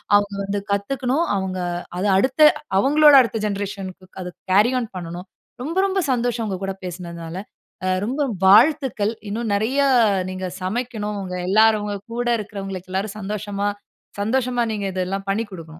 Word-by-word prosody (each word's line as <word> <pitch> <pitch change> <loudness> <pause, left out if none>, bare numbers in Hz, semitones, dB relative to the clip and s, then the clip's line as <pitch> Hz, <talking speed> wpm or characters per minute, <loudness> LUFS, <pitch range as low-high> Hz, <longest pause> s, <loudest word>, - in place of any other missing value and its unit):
அவங்க 205 0 +2
வந்து 200 +1 -2
கத்துக்கணும், 255 +9 0
அவங்க 190 -1 -2 0.4
அத 190 - -1
அடுத்த 260 +8 0 0.4
அவங்களோட 295 +6 +6
அடுத்த 230 -2 -2
ஜெனரேஷன்னுக்கு 195 -2 -5
அத 180 - -5 0.2
கேரி 210 +6 +5
ஆன் 230 -3 -4
பண்ணனும். 175 +2 -7 0.4
ரொம்ப 330 +6 -4
ரொம்ப 385 0 0
சந்தோஷம் 240 -2 0
உங்க 190 -2 -3
கூட 195 0 -2
பேசினதனால. 170 -1 -7 0.5
அ - - 0 0.2
ரொம்ப 270 +6 -2 0.2
வாழ்த்துக்கள். 230 0 +4 0.2
இன்னும் 220 0 -2
நிறைய 235 +7 0 0.5
நீங்க 185 0 -5 0.2
சமைக்கணும். 210 0 -3
உங்க 180 -1 -5
எல்லாரும் 215 +1 +4
உங்க 205 -1 -3 0.2
கூட 240 0 -2
இருக்கிறவங்களுக்கு 195 -3 -6
எல்லாரும் 200 +2 -2
சந்தோஷமா 205 0 -3 0.5
சந்தோஷமா 245 +2 +1
நீங்க 205 -2 -3
இதை 185 -1 -1
எல்லாம் 195 +1 -4
பண்ணிக் 210 0 -2
கொடுக்கனும். 165 -3 -8
205 Hz, 150 wpm, -22 LUFS, 190-240 Hz, 0.5 s, அவங்களோட